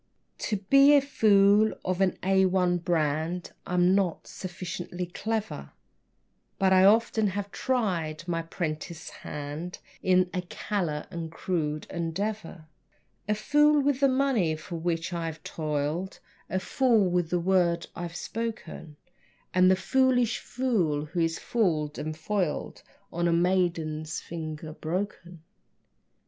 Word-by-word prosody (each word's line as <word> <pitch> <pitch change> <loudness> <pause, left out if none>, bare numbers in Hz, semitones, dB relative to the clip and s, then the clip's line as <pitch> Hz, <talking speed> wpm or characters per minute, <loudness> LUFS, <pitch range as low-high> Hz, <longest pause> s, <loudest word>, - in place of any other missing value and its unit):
To 210 - -1
be 275 +9 +6
a - - +8
fool 210 -5 +4
of 185 +1 -1
an 190 -1 +3
A1 185 -2 +2
brand 165 +1 -1 0.2
I'm 180 +1 +3
not 190 -4 0
sufficiently 180 -1 -6
clever, 215 +4 -4 0.8
But 190 -1 +3
I 185 0 +6
often 220 +1 +4
have 200 +1 -3
tried 175 - -1
my 165 -1 -1
'prentice 165 0 -5
hand 150 +5 -6 0.2
In 185 -1 +3
a 180 - -1
callow 175 -4 -3
and 165 -1 -5
crude 155 -3 -2
endeavor; 170 0 -4 0.6
A 210 - +3
fool 295 +7 +4
with 280 -2 +1
the 280 - +5
money 255 - +2
for 155 +2 -8
which 170 +1 -2
I've 165 -2 -4
toiled, 155 +4 -3 0.3
A 190 - 0
fool 230 -1 +2
with 175 -2 0
the 175 - +1
word 170 -2 +2
I've 170 -1 -6
spoken, 220 -10 -5 0.6
And 185 0 +5
the 190 - +5
foolish 245 +3 +2
fool 185 - 0
who 165 +3 -4
is 165 0 +1
fooled 160 -10 0
and 155 0 -4
foiled 175 -2 -2 0.3
On 175 0 0
a - - +2
maiden's 170 -3 0
finger 155 -1 -6
broken. 175 0 -5
180 Hz, 130 wpm, -27 LUFS, 165-205 Hz, 0.8 s, a